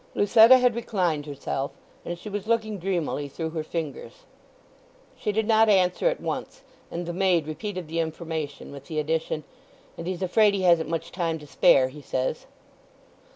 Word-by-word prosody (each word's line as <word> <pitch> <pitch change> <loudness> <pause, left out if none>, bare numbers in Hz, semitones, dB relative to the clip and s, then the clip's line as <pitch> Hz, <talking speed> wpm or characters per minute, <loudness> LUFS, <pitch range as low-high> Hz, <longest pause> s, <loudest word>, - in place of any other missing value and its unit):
Lucetta 225 +5 +7
had 250 -1 +3
reclined 180 -10 -1
herself, 140 -1 -3 0.3
and 175 - -5
she 175 - -11
was 205 0 -4
looking 220 -3 0
dreamily 170 -5 -2
through 160 +3 -5
her 160 -1 -3
fingers. 165 - -6 0.9
She 215 - -2
did 220 +1 0
not 220 -1 +5
answer 185 - +3
at - - 0
once, - - -5 0.3
and 175 +1 -4
the 175 - -4
maid 180 -3 +2
repeated 185 +2 -5
the 165 +2 -3
information 160 -3 -4
with 140 -1 -10
the 155 - -6
addition, 155 0 -1 0.6
"And 165 - -5
he's 185 0 -3
afraid 205 +3 +4
he 190 - -2
hasn't 170 -3 +4
much 165 -1 -3
time 165 -3 -1
to 150 - -12
spare, 135 -2 +4
he 145 +3 -11
says." 130 -2 -3
170 Hz, 170 wpm, -25 LUFS, 155-205 Hz, 0.9 s, Lucetta